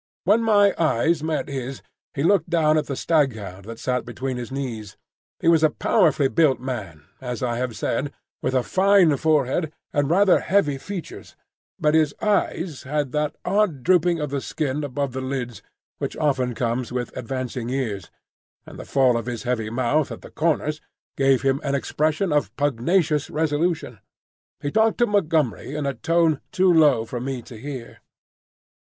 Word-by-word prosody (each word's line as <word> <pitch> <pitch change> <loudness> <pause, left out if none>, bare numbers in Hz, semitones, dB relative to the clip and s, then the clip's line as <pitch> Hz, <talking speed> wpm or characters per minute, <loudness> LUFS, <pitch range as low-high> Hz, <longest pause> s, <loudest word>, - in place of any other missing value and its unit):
When 210 +5 +4
my 205 -3 +4
eyes 160 +1 +2
met 155 0 -2
his, 135 -1 -5 0.3
he 140 - -1
looked 175 -2 +3
down 160 -3 +3
at 155 - 0
the 140 - -3
staghound 110 - -1
that 115 +1 -8
sat 125 +1 -1
between 130 +1 -4
his 120 +1 -6
knees. 120 -7 -5 0.4
He - - -2
was 165 -2 +5
a 155 - +5
powerfully 155 -4 +2
built 150 -1 +2
man, 105 - -6 0.2
as 125 -1 -4
I 120 -1 -1
have 125 -2 -3
said, 130 +6 -2 0.3
with 130 - -1
a 130 - +2
fine 190 -3 +4
forehead 155 +1 +1 0.2
and 145 -1 +1
rather 190 +2 +5
heavy 150 -9 +1
features; 190 +2 -8 0.4
but 150 0 +2
his 155 -2 +3
eyes 185 -6 0
had 145 -1 -2
that 150 +1 -1
odd 180 -8 +1
drooping 175 -1 +3
of 150 -2 -3
the 140 -1 -2
skin 150 0 -2
above 140 -1 -3
the 130 - -3
lids 130 -4 -4 0.4
which - - -4
often 130 -5 0
comes 120 +1 -2
with 125 -1 -4
advancing 125 -1 -4
years, 110 -9 -3 0.6
and - - -11
the - - -7
fall 130 -3 +3
of 115 0 -5
his 120 -2 -4
heavy 120 -3 -1
mouth 130 +5 0
at - - -7
the - - -12
corners 155 -1 0 0.3
gave 135 -1 +3
him 135 0 +1
an 140 -1 0
expression 155 +5 0
of 145 -10 +1
pugnacious 145 +3 +1
resolution. 160 +2 -1 0.6
He 145 - -2
talked 220 +3 +3
to 240 - +4
Montgomery 160 - 0
in 150 -2 -2
a 140 - 0
tone 165 +3 +1
too 185 -1 +3
low 145 -8 +4
for 120 +1 -5
me 130 -1 -4
to 120 - -12
hear. 130 0 -8
145 Hz, 170 wpm, -23 LUFS, 125-160 Hz, 0.6 s, was